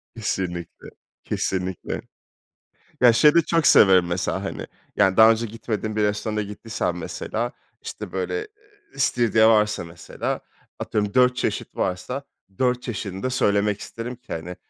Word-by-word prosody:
Kesinlikle, 90 -6 -4 0.4
kesinlikle. 95 -1 -3 1.0
Ya, 120 -2 +7
şeyi 150 +6 +6
de 170 - +7
çok 165 -2 +1
severim 95 -3 +6
mesela, 85 +1 -2
hani, - - -5 0.3
yani 95 -2 +3
daha 110 +1 +9
önce 115 +1 0
gitmediğin 110 -1 -4
bir 105 - +1
restorana 105 +1 -1
gittiysem 105 -3 -3
mesela, 115 +7 -4 0.3
işte - - -7
böyle 435 - -2 0.5
i - - -20
istiridye 115 -2 +3
varsa 105 -3 +3
mesela, 85 -1 -5 0.4
atıyorum 105 -1 -2
4 125 -1 +4
çeşit - - -3
varsa, 125 +10 -2 0.4
4 125 -1 +1
çeşidini 100 -4 -5
de 130 - 0
söylemek 105 -4 +1
isterim 120 +4 -6
ki 125 - -9
hani, 85 +2 -6
110 Hz, 140 wpm, -23 LUFS, 95-120 Hz, 1.0 s, daha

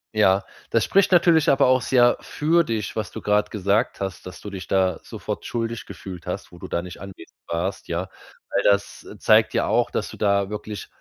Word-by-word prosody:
Ja. 95 -2 +4 0.3
Das - - +2
spricht 195 0 +3
natürlich 170 -2 +5
aber 135 - +4
auch 130 0 +4
sehr 120 0 +4
für 165 +3 +1
dich, 110 -8 -3
was 105 -4 -3
du - - -7
grad 105 0 +1
gesagt 105 +3 0
hast, 95 -1 -5
dass 90 - -9
du 105 - -7
dich 95 -2 -7
da 95 -2 +1
sofort - - -6
schuldig 115 -1 -3
gefühlt 90 -3 -9
hast, 90 +1 -5
wo 90 - -13
du 95 - -8
da 85 - -1
nicht 90 0 -10
anwesend 95 -4 -11
warst, 85 +4 -3
ja. 90 +3 -3 0.4
Weil - - 0
das 100 0 +1
zeigt - - +4
ja - - +1
auch, - - +1
dass - - -2
du - - -10
da 100 -1 +1
wirklich 105 -1 -6
100 Hz, 205 wpm, -23 LUFS, 95-115 Hz, 0.4 s, natürlich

